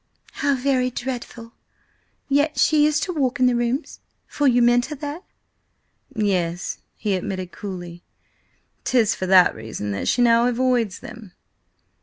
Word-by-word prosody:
"How 280 0 0
very 255 -1 +1
dreadful! 240 -2 -6 0.7
Yet 290 +2 +1
she 300 -1 +4
used 300 0 +1
to 360 - -3
walk 275 -3 -1
in 255 - +4
the 250 -1 +3
Rooms, 240 +5 -2 0.3
for 290 - 0
you 245 -1 +4
met 240 +1 +3
her 300 - -6
there?" 295 +3 -6 0.9
"Yes," 180 -5 -1 0.2
he 205 - -2
admitted 185 -1 -4
coolly. 175 -3 -8 0.8
"'Tis 230 -4 +2
for 185 - -4
that 185 -1 +6
reason 110 -2 -6
that 100 - -3
she 245 - +3
now 235 0 +4
avoids 245 -4 0
them." 210 -5 -11
240 Hz, 145 wpm, -22 LUFS, 190-265 Hz, 0.9 s, that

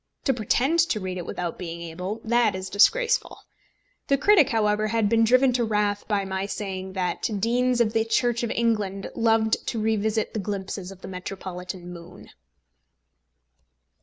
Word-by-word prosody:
To 270 - +2
pretend 255 - +1
to 215 - 0
read 185 -2 -4
it 175 - -7
without 175 -2 -4
being 170 -2 -6
able, 180 +6 -5
that 235 -3 +2
is 185 0 -6
disgraceful. 485 - +3 0.7
The 275 - +3
critic, 345 0 +5
however, 215 -1 +1
had 225 -1 +1
been 230 0 +4
driven 255 +3 +4
to 240 -1 +1
wrath 210 -2 0
by 205 -2 0
my 190 0 -3
saying 190 -2 -5
that 185 -2 -1
Deans 245 +3 +1
of 225 -2 +2
the 225 - +2
Church 235 +1 +1
of 235 - -2
England 210 -5 -1
loved 225 -1 +2
to 230 - -2
revisit 220 0 0
the 220 - -2
glimpses 195 -2 -4
of 190 -1 -13
the - - -8
metropolitan 180 -1 -7
moon. 170 0 -12
210 Hz, 165 wpm, -25 LUFS, 190-230 Hz, 0.7 s, critic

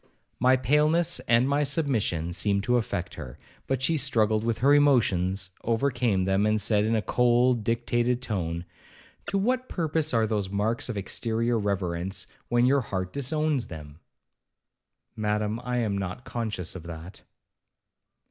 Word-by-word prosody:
My 130 +2 +4
paleness 150 +6 +2
and 120 +2 +4
my 140 +1 +1
submission 115 - 0
seemed 100 +2 +1
to 125 +3 +2
affect 100 -6 -3
her,—but 80 - -6
she 160 +3 +2
struggled 110 -6 +1
with 115 -1 0
her 135 +5 +4
emotions, 95 -10 +2
overcame 115 -5 +1
them, 95 +2 +2
and 110 0 +2
said 105 0 +2
in 115 +1 +1
a 110 - 0
cold 120 -1 +2
dictated 120 +1 0
tone, 90 -8 -3 0.6
'To 200 - 0
what 255 +5 0
purpose 160 -2 -1
are 115 -2 +2
those 105 -3 -1
marks 105 +5 -1
of 115 - -3
exterior 115 +3 -1
reverence, 95 -2 -2 0.2
when 120 0 +3
your 135 +2 +3
heart 95 -5 -4
disowns 145 -1 0
them?' 75 -2 -10 1.2
'Madam, 105 +1 -1
I 125 0 -2
am 110 -4 0
not 95 +5 -4
conscious 110 -8 -3
of 95 - -6
that.' 85 +2 -9
115 Hz, 145 wpm, -27 LUFS, 100-130 Hz, 1.2 s, My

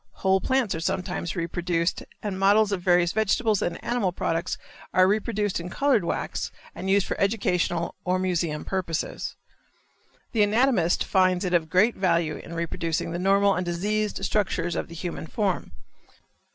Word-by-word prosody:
Whole 190 0 +2
plants 260 -6 +1
are 165 - -3
sometimes 180 +1 -2
reproduced 170 0 -1 0.2
and 200 -3 -3
models 205 +2 +4
of 195 -3 -1
various 175 -1 +3
vegetable 220 +1 +2
and 170 -1 -1
animal 235 -6 0
products 170 0 -2 0.4
are 185 0 +6
reproduced 210 -1 0
in 170 +1 -6
colored 280 +9 +2
wax - - -3 0.2
and 190 - -5
used 195 0 +4
for - - -2
educational 185 -5 0
or 180 0 +1
museum 170 -4 -1
purposes. 180 -4 -3 1.0
The 225 - +2
anatomist 210 -4 +3
finds 185 0 +2
it 180 - -1
of 165 -2 +2
great 205 +8 +3
value 170 -5 +1
in 170 - -9
reproducing 165 0 -2
the 170 - -3
normal 195 +2 +4
and 180 - -1
diseased 200 +3 -1
structures 175 -5 0
of - - -2
the 170 - -10
human 170 -1 -5
form. 195 0 -1
185 Hz, 155 wpm, -25 LUFS, 170-205 Hz, 1.0 s, are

